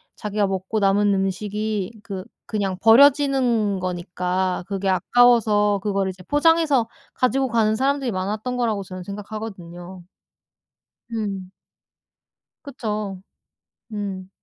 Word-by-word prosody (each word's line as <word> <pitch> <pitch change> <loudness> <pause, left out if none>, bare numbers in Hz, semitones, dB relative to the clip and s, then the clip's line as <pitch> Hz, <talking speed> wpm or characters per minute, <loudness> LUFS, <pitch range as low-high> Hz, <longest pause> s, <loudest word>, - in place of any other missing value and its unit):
자기가 210 -1 -1
먹고 190 +3 -2
남은 200 0 +3
음식이 205 +2 -2
그 195 -4 -6 0.2
그냥 195 -4 -2
버려지는 250 -4 +4
거니까 180 0 -2
그게 195 -1 -2
아까워서 210 -1 +4
그거를 195 -2 0
이제 185 0 -9
포장해서 295 - +3 0.3
가지고 260 +1 +1
가는 220 -2 +2
사람들이 270 0 0
많았던 210 +6 -3
거라고 220 -5 0
저는 185 -1 -8
생각하거든요. 190 -3 -8 1.1
음. 200 -4 -4 1.2
그쵸. 210 -8 -4 0.7
음. 195 -3 -5
205 Hz, 260 characters per minute, -22 LUFS, 190-230 Hz, 1.2 s, 버려지는